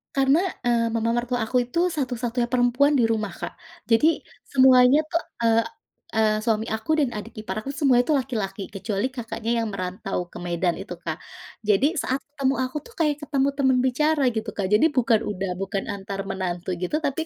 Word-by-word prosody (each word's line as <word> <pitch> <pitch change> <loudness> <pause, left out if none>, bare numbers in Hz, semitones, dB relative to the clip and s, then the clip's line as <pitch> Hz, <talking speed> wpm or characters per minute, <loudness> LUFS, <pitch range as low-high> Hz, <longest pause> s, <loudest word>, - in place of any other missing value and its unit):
karena, 275 +3 +4 0.3
e - - +3 0.2
mama 230 0 0
mertua 245 +1 -1
aku 250 +3 0
itu 245 +7 -2
satu-satunya 245 -5 -1
perempuan 250 +3 +3
di - - +4
rumah, 215 -4 -1
Kak. - - -6 0.4
Jadi 225 +6 +5 0.4
semuanya 260 +1 +6
tuh, 335 - +1 0.2
eee, 230 0 +4 0.5
eee, 215 -1 +3
suami 220 -1 +1
aku 220 +7 -4
dan 275 - +2
adik 215 +2 -8
ipar 215 - -5
aku 275 - -4
semuanya 270 -5 +3
itu 310 - +2
laki-laki, 220 -8 -2
kecuali 200 +4 -2
kakaknya 230 -2 -4
yang - - -2
merantau 185 -1 -4
ke - - -10
Medan 175 0 -1
itu, 195 -1 -7
Kak. 160 -2 -4 0.5
Jadi 265 - +3
saat 265 -1 -1
ketemu 275 -2 0
aku 255 +3 -3
tuh 470 - -15
kayak 300 -3 +2
ketemu 280 -1 +1
teman 265 -2 +3
bicara, 290 +4 +2
gitu, 220 -2 -3
Kak, 195 -2 -2
jadi 210 +9 +5
bukan 230 -4 +3
udah 195 -2 -3
bukan 195 0 -2
antar 195 -1 -5
menantu 180 -2 -3
gitu 180 - -2
tapi 300 +2 -1
235 Hz, 180 wpm, -24 LUFS, 205-270 Hz, 0.5 s, semuanya